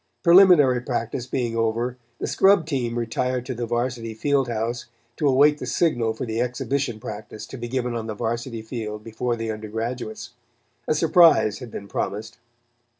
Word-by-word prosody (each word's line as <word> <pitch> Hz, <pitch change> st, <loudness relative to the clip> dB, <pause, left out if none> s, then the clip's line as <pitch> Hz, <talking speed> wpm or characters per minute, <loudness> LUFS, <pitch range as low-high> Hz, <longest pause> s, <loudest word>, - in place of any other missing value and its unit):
Preliminary 170 Hz, -9 st, +6 dB
practice 120 Hz, 0 st, -3 dB
being 120 Hz, -3 st, -2 dB
over, 115 Hz, +2 st, 0 dB, 0.2 s
the -, -, -3 dB
scrub 195 Hz, -4 st, +4 dB
team 125 Hz, -6 st, -2 dB
retired 125 Hz, +2 st, -1 dB
to 130 Hz, -, -3 dB
the 120 Hz, -1 st, -4 dB
Varsity 120 Hz, -1 st, -2 dB
field 140 Hz, +2 st, +1 dB
house, 115 Hz, +1 st, -3 dB, 0.3 s
to 150 Hz, -, +1 dB
await 145 Hz, +2 st, +4 dB
the -, -, -5 dB
signal 120 Hz, -9 st, +1 dB
for 115 Hz, -, -4 dB
the 115 Hz, 0 st, -2 dB
exhibition 125 Hz, -1 st, -2 dB
practice 110 Hz, -2 st, -8 dB
to -, -, -10 dB
be 120 Hz, -2 st, -5 dB
given 125 Hz, -1 st, -2 dB
on 115 Hz, -1 st, -4 dB
the 110 Hz, -, -4 dB
Varsity 115 Hz, +1 st, -3 dB
field 110 Hz, -2 st, -6 dB
before 120 Hz, +2 st, -2 dB
the 115 Hz, -1 st, -3 dB
undergraduates. 110 Hz, +2 st, -5 dB, 0.6 s
A 155 Hz, -, +2 dB
surprise 160 Hz, -, +5 dB
had 125 Hz, -, -8 dB
been 100 Hz, -2 st, -8 dB
promised. 110 Hz, +3 st, -4 dB
120 Hz, 165 wpm, -24 LUFS, 110-130 Hz, 0.6 s, Preliminary